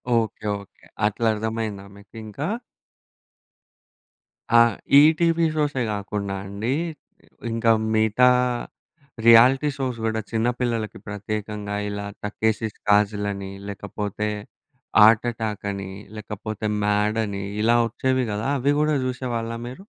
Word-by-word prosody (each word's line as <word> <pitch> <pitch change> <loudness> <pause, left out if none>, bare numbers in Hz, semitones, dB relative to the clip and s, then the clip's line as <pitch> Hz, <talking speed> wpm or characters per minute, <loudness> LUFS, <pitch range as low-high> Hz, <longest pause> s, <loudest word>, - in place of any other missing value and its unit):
Okay. 110 -2 -1 0.2
Okay. 100 - -20 0.2
అట్లా 110 +2 0
అర్థమయిందా 110 -2 -3
మీకు 100 +2 -18
ఇంకా? 110 +8 -5 2.1
ఆ! - - +9 0.4
ఈటీవీ 165 +2 +4
షో‌సే 145 -4 0
కాకుండా 100 -1 -3
అండి. 100 +5 -3 0.8
ఇంకా 115 0 +2 0.2
మిగతా 110 +3 +4 1.0
రియాలిటీ 125 +5 +7
షోస్ 130 -3 -2
కూడా 110 0 0
చిన్న 115 +1 +1
పిల్లలకి 115 -4 -2
ప్రత్యేకంగా 105 0 -4
ఇలా 100 0 -4 0.2
'టక్కేసి‌స్ 110 0 -1
కాజల్' 105 0 +3
అని, 100 -1 -7 0.2
లేకపోతే 105 +1 -4 0.8
'ఆర్ట్ 110 +2 +6
అటాక్' 110 -3 -4
అని, 95 -1 -6 0.3
లేకపోతే 105 0 -6 0.2
'మాడ్' 105 +2 +1
అని, 100 -1 -4 0.2
ఇలా 115 +1 +4
వచ్చేవి 130 +2 0
కదా 105 +4 -2
అవి 140 +3 +2
కూడా 150 0 +2
జూసేవాళ్ళా 120 -2 -3
మీరు? 130 +11 -9
110 Hz, 110 wpm, -23 LUFS, 105-120 Hz, 2.1 s, ఆ